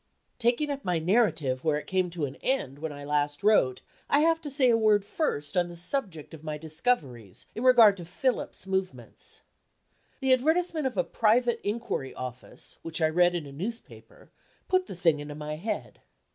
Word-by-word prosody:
Taking 245 Hz, +5 st, +1 dB
up 275 Hz, 0 st, -5 dB
my 180 Hz, -2 st, 0 dB
narrative 160 Hz, -, +1 dB
where 155 Hz, -2 st, +2 dB
it 150 Hz, -, -6 dB
came 185 Hz, -1 st, 0 dB
to 165 Hz, -3 st, -3 dB
an 135 Hz, -, -7 dB
end 145 Hz, -, -1 dB
when 160 Hz, 0 st, -4 dB
I 145 Hz, 0 st, -9 dB
last 145 Hz, +1 st, -1 dB
wrote, 165 Hz, -12 st, +3 dB, 0.3 s
I 290 Hz, -, +4 dB
have 325 Hz, +1 st, +3 dB
to 295 Hz, -, -6 dB
say 265 Hz, -3 st, +3 dB
a -, -, +4 dB
word 215 Hz, -3 st, +3 dB
first 175 Hz, -, -2 dB
on 175 Hz, -1 st, +2 dB
the 175 Hz, -, -9 dB
subject 175 Hz, -, -3 dB
of 160 Hz, -1 st, -11 dB
my 155 Hz, -1 st, -4 dB
discoveries, 150 Hz, -, -3 dB
in 230 Hz, -, -5 dB
regard 235 Hz, -6 st, +7 dB
to 175 Hz, -, -8 dB
Philip's 225 Hz, +5 st, -2 dB
movements. 190 Hz, -1 st, -5 dB, 0.8 s
The 265 Hz, -1 st, +3 dB
advertisement 315 Hz, +3 st, +1 dB
of 250 Hz, -, -6 dB
a 180 Hz, -, +3 dB
private 235 Hz, +3 st, +2 dB
inquiry 205 Hz, -, -3 dB
office, 125 Hz, -1 st, -8 dB
which 165 Hz, 0 st, -3 dB
I 160 Hz, -1 st, +3 dB
read 175 Hz, +2 st, +3 dB
in 165 Hz, -4 st, -3 dB
a 140 Hz, -, -10 dB
newspaper, 230 Hz, -, -8 dB, 0.4 s
put 370 Hz, 0 st, +1 dB
the -, -, -7 dB
thing 165 Hz, -4 st, +2 dB
into 145 Hz, 0 st, -7 dB
my 150 Hz, 0 st, -5 dB
head. 210 Hz, +7 st, -5 dB
185 Hz, 185 wpm, -28 LUFS, 150-245 Hz, 0.8 s, regard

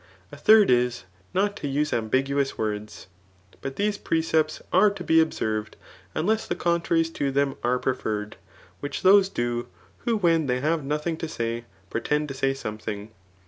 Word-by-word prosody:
^ -, -, -28 dB, 0.3 s
A -, -, -8 dB
third 210 Hz, +4 st, +6 dB
ly 125 Hz, 0 st, +4 dB, 0.4 s
not 205 Hz, +2 st, +1 dB
to 145 Hz, -, -4 dB
use 150 Hz, +2 st, 0 dB
ambiguous 135 Hz, +5 st, 0 dB
words. 105 Hz, -1 st, -4 dB, 0.6 s
But 135 Hz, 0 st, -5 dB
diese 205 Hz, +3 st, 0 dB
precepts 160 Hz, -1 st, +1 dB
are 190 Hz, +4 st, +6 dB
to 195 Hz, -3 st, -7 dB
be 160 Hz, -1 st, +4 dB
observed, 110 Hz, -9 st, -2 dB, 0.4 s
unless 215 Hz, +8 st, 0 dB
the -, -, -1 dB
contraries 170 Hz, -1 st, +1 dB
to 140 Hz, -3 st, -1 dB
them 140 Hz, 0 st, +1 dB
are 125 Hz, +1 st, +2 dB
pre« 130 Hz, +1 st, 0 dB
ferred, 105 Hz, -4 st, -4 dB, 0.5 s
which 145 Hz, 0 st, -5 dB
those 195 Hz, 0 st, +6 dB
do, 120 Hz, -5 st, -2 dB, 0.3 s
who 230 Hz, -2 st, 0 dB
when 165 Hz, -6 st, +2 dB
they 125 Hz, 0 st, +1 dB
have 155 Hz, +3 st, 0 dB
nothing 150 Hz, +3 st, -2 dB
to 165 Hz, -, -4 dB
sty, 115 Hz, -4 st, -3 dB, 0.3 s
pretend 150 Hz, +6 st, 0 dB
to -, -, -4 dB
say 135 Hz, 0 st, 0 dB
something. 110 Hz, -3 st, -6 dB
145 Hz, 170 wpm, -25 LUFS, 120-165 Hz, 0.6 s, third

